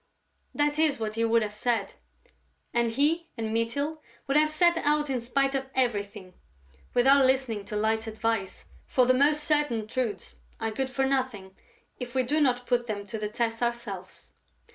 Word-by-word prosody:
That 295 +1 +1
is 310 -3 +3
what 215 -1 -3
he 230 +1 -1
would 230 0 +3
have 210 -1 -4
said; 220 -1 -1 0.8
and 235 -1 +2
he 310 +8 +1
and 220 -1 -3
Mytyl 285 +8 -1 0.2
would 275 - -1
have 305 +1 +5
set 340 +3 +3
out 295 -1 +1
in 250 -2 -1
spite 270 +3 0
of 265 -1 -2
everything, 205 -6 -1 0.6
without 265 +2 +6
listening 260 -6 0
to 210 - -6
Light's 220 +1 0
advice, 220 -3 -2 0.2
for 255 - +3
the 255 - +4
most 295 +3 +3
certain 295 -8 +1
truths 220 -5 -3 0.2
are 225 0 -2
good 260 +4 -2
for 270 +1 0
nothing 255 -8 -2 0.4
if 250 0 -6
we 260 - +3
do 295 +5 +1
not 250 -3 +2
put 240 -1 0
them 205 -2 -4
to 220 +2 -6
the 210 0 -3
test 225 +1 -2
ourselves. 220 -6 -4
245 Hz, 175 wpm, -27 LUFS, 220-275 Hz, 0.8 s, without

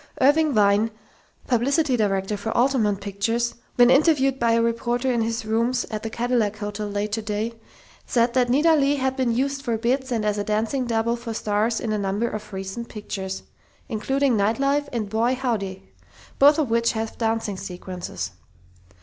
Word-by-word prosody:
Irving 295 +1 +4
Wein, 205 +1 +4 0.6
publicity 265 +3 +2
director 200 -2 0
for 205 +2 -5
Altamont 235 -6 +2
Pictures, 225 +4 -1 0.2
when 245 0 +6
interviewed 270 -2 +3
by 235 -1 +3
a 230 - +3
reporter 240 +2 0
in 235 -2 +1
his 225 0 -2
rooms 235 +3 0
at 215 -1 -3
the 225 - -4
Cadillac 230 -3 0
Hotel 210 0 -4
late 205 +1 -2
today, 215 +1 -2 0.5
said 235 0 +2
that 250 -1 +2
Nita 300 +6 +4
Leigh 285 -2 +3
had 265 -1 -1
been 260 -3 +1
used 275 +4 -1
for 235 -4 -1
"bits" 255 +3 -1
and 225 -3 0
as 210 0 0
a - - 0
dancing 220 +5 -1
"double" 230 0 +1
for 235 -1 -6
stars 215 +2 0
in 225 - -3
a 215 - 0
number 200 +4 -1
of 215 -1 -6
recent 195 +4 -6
pictures, 190 -3 -5 0.5
including 265 +3 +1
"Night 210 +2 +1
Life" 285 +1 +1
and 225 -4 -2
"Boy, 230 +5 +1
Howdy!", 200 - -3 0.5
both 290 +2 +7
of 290 -7 0
which 230 0 +2
have 220 0 -4
dancing 225 -3 -1
sequences. 180 - -6
230 Hz, 175 wpm, -24 LUFS, 210-255 Hz, 0.6 s, both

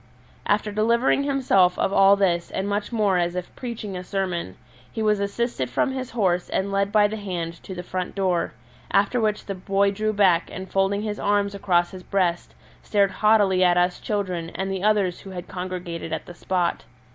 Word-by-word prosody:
After 210 +1 +1
delivering 235 +6 +2
himself 220 -11 +3
of 195 - 0
all 195 0 +6
this 175 -4 +1
and 190 - -3
much 205 +2 -2
more 205 -5 +2
as 175 0 -1
if 180 -1 -5
preaching 225 -5 -6
a 180 - -5
sermon, 180 - -3 0.3
he 220 - -3
was 210 -1 +2
assisted 200 - -2
from 195 - 0
his 260 -1 -4
horse 185 -6 0
and 195 +1 -1
led 200 0 0
by 210 0 +5
the 215 +1 -5
hand 175 -5 -5
to 190 - -8
the 180 - -6
front 180 0 -4
door, 185 -3 0 0.4
after 200 +5 +2
which 215 -1 0
the 200 - -3
boy 195 +1 +1
drew 215 +2 -1
back 190 -5 +3
and 190 +1 -7
folding 195 +1 +1
his 210 -1 -3
arms 205 0 +1
across 175 -3 +1
his 185 -1 -9
breast 180 -3 -1 0.3
stared 200 -2 +2
haughtily 200 -2 +3
at 175 -1 +4
us 180 0 +2
children 185 -6 -2
and 190 +2 -2
the 190 -1 -3
others 205 -4 +2
who 195 - -11
had 180 -1 -7
congregated 180 -3 -5
at 160 - -3
the 175 - -10
spot. 175 0 -1
195 Hz, 195 wpm, -24 LUFS, 180-210 Hz, 0.4 s, all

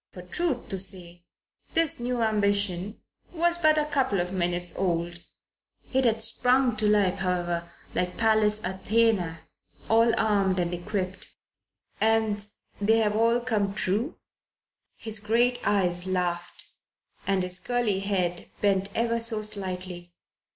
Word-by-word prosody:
For, 180 - -11
truth 275 - -2
to 195 -2 -2
say, 175 -2 -7 0.5
this 330 -5 +2
new 240 -1 -1
ambition 200 -2 0 0.3
was 345 0 +1
but 310 -2 +4
a 305 - +2
couple 265 -9 0
of 180 +1 -2
minutes 175 -1 0
old. 175 -1 -2 0.7
It 265 0 +2
had 225 -1 +2
sprung 255 +2 +3
into 215 -1 0
life, 200 -2 +2
however, 175 -2 -1 0.2
like 180 0 -2
Pallas 215 -1 +3
Athene, 190 -2 +1 0.5
all 230 +1 +5
armed 200 -4 +2
and 175 -1 -1
equipped. 185 +1 -4 0.7
"And 220 -2 +1 0.3
they 220 +2 +4
have 210 -2 +1
all 230 +2 +3
come 210 -5 -1
true?" 210 - -1 0.8
His 220 -2 -1
great 240 +4 +2
eyes 180 -3 +2
laughed 175 -2 -2 0.6
and 195 -2 +1
his 180 0 -1
curly 240 -5 0
head 185 -3 -1
bent 195 -1 +1
ever 230 0 +1
so 230 -2 +3
slightly. 185 -4 -4
205 Hz, 130 wpm, -26 LUFS, 180-230 Hz, 0.8 s, all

